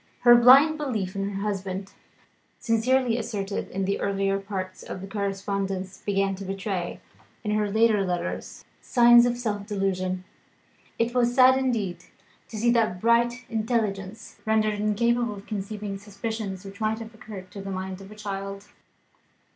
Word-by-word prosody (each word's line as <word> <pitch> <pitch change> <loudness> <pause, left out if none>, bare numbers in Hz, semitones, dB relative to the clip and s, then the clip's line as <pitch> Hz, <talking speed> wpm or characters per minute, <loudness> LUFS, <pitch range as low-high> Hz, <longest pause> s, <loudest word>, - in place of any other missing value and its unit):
Her 240 -1 +8
blind 275 +6 +7
belief 215 -10 -2
in 195 0 -1
her 195 -1 -4
husband, 195 -1 -3 0.6
sincerely 240 +1 +2
asserted 200 -3 -3
in 195 0 -2
the 200 +1 -1
earlier 195 0 0
part 190 -2 -5
of - - -7
the 190 - -7
correspondence, 195 -1 -3
began 195 -1 +1
to 195 - -7
betray, 195 -2 -3 0.4
in 210 - -1
her 210 -1 +1
later 220 -1 +3
letters, 175 -2 -4 0.2
signs 240 -1 +6
of 240 0 -1
self 205 -4 -3
delusion. 185 -2 -1 0.7
It 230 +1 0
was 245 -1 +2
sad 260 0 +7
indeed 235 -9 -1 0.4
to 220 - -8
see 235 +3 +3
that 220 -6 +2
bright 235 +3 +2
intelligence 220 -3 -2
rendered 215 -1 +1
incapable 235 +2 +1
of 200 0 -11
conceiving 205 -1 -5
suspicions, 205 -1 -5
which 195 +2 -10
might 215 0 +1
have 225 0 -9
occurred 200 -4 -10
to 200 - -7
the 195 - -6
mind 190 0 -5
of 195 +1 -12
a - - -10
child. 200 -1 -6
205 Hz, 155 wpm, -26 LUFS, 195-230 Hz, 0.7 s, Her